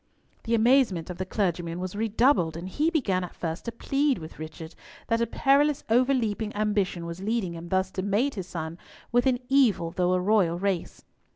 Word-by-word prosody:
The 230 0 +2
amazement 225 -7 +3
of 175 - -9
the 185 - -3
clergyman 175 -4 -1
was 185 +1 -5
redoubled, 220 - +2
and 170 +2 -6
he 295 - +1
began 210 - 0
at 180 - -8
first 165 0 -4
to 235 - -3
plead 275 +4 0
with 160 -2 -10
Richard 160 +1 -8 0.4
that 230 0 +2
a 235 - +1
perilous 280 +4 +2
overleaping 230 -4 +1
ambition 205 -5 0
was 170 +2 -6
leading 210 -4 -1
him 170 +1 -8
thus 190 0 0
to 190 - -3
mate 210 +8 +1
his 190 -4 -6
son 165 -1 -6 0.3
with 245 +2 +3
an 255 -2 +3
evil, 245 -11 +3
though 180 +1 +1
a 185 - +2
royal, 180 -3 +2
race. 190 -2 -3
200 Hz, 190 wpm, -26 LUFS, 175-235 Hz, 0.4 s, amazement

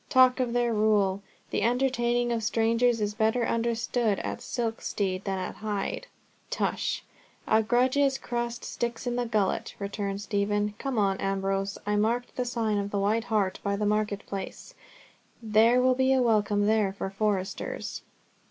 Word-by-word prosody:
"Talk 255 0 +5
of 245 -2 0
their 240 -1 +1
rule! 205 -3 +2 0.3
The - - 0
entertaining 240 0 +1
of 230 -1 0
strangers 230 +1 +2
is 210 0 0
better 220 +2 +1
understood 230 -2 0
at - - -4
Silkstede 205 -5 -2
than 195 -1 -1
at 185 - -5
Hyde." 210 - -3 0.4
"Tush! - - -1 0.4
A 220 - +4
grudged 260 +4 +2
crust 240 0 -3
sticks 235 0 -3
in 245 -1 -1
the 245 -1 -1
gullet," 215 -4 0
returned 200 -1 -3
Stephen. 205 0 0
"Come 270 -3 -3
on, 195 -2 +2
Ambrose, 195 0 -1
I 210 0 +1
marked 235 +4 0
the 250 - -1
sign 225 -4 0
of 200 0 -2
the 205 - -2
White 215 +3 +1
Hart 210 -5 0
by 200 0 0
the 210 +1 -1
market 210 -1 0
place. 195 - -7 0.7
There 225 +2 +4
will 255 0 +4
be 260 +1 +3
a 260 - +3
welcome 210 -3 +2
there 215 -2 +2
for 195 -1 -4
foresters." 195 -1 -2
220 Hz, 160 wpm, -28 LUFS, 205-240 Hz, 0.7 s, Talk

